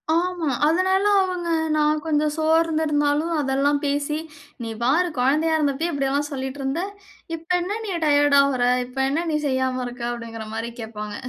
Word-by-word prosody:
ஆமா. 345 -3 0 0.2
அதனால 375 +4 +2 0.2
அவங்க 365 -2 -2 0.3
நான் 300 0 +2
கொஞ்சம் 300 -1 +1
சோர்ந்திருந்தாலும் 315 -1 +1
அதெல்லாம் 285 +1 +1
பேசி, 290 +2 -1 0.4
நீ 230 - -4
பாரு 320 +9 +3
குழந்தையா 305 +6 +2
இருந்தபையே 300 +2 0
இப்டியெல்லாம் 280 +1 0
சொல்லிட்டு 265 0 -4
இருந்த! 270 +6 -1 0.5
இப்ப 330 +2 -18
என்ன 405 +5 -3
நீ - - -3
டயர்ட் 290 -1 +4
ஆவுரா? 255 -3 +2 0.2
இப்ப 250 +2 -15
என்ன 325 +5 -1
நீ 300 - +1
செய்யாம 260 -1 0
இருக்க? 245 0 -8
அப்டிங்கிற 230 -2 -7
மாரி 230 +1 -4
கேட்பாங்க. 210 -2 -6
290 Hz, 150 wpm, -23 LUFS, 265-320 Hz, 0.5 s, டயர்ட்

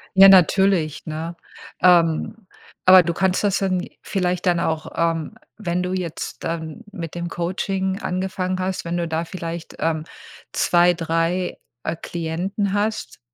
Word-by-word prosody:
Ja, 195 +1 +10
natürlich, 190 -3 +4
ne? 160 +2 -5 0.5
Ähm, 180 +4 +3 0.4
aber 185 0 +9
du 170 0 -1
kannst 190 +2 +1
das 200 -2 +2
dann 185 -2 0
vielleicht 180 -2 -1
dann 175 -2 +3
auch, 160 -2 -2
ähm 165 -2 -1 0.3
wenn 180 -1 -1
du 180 - -2
jetzt 180 -4 -4
dann 165 +4 -4
mit 165 -3 -6
dem 175 0 -3
Coaching 190 +3 -2
angefangen 185 0 -2
hast, 185 -1 -2
wenn 170 - -2
du 170 -1 -2
da 160 +1 -1
vielleicht, 170 -1 -6
ähm, 160 0 -1 0.5
2, 175 0 +4
3, 165 +2 -1 0.3
äh, 160 - -2
Klienten 180 +5 -2
hast, 210 -5 -2
175 Hz, 145 wpm, -22 LUFS, 165-190 Hz, 0.5 s, Ja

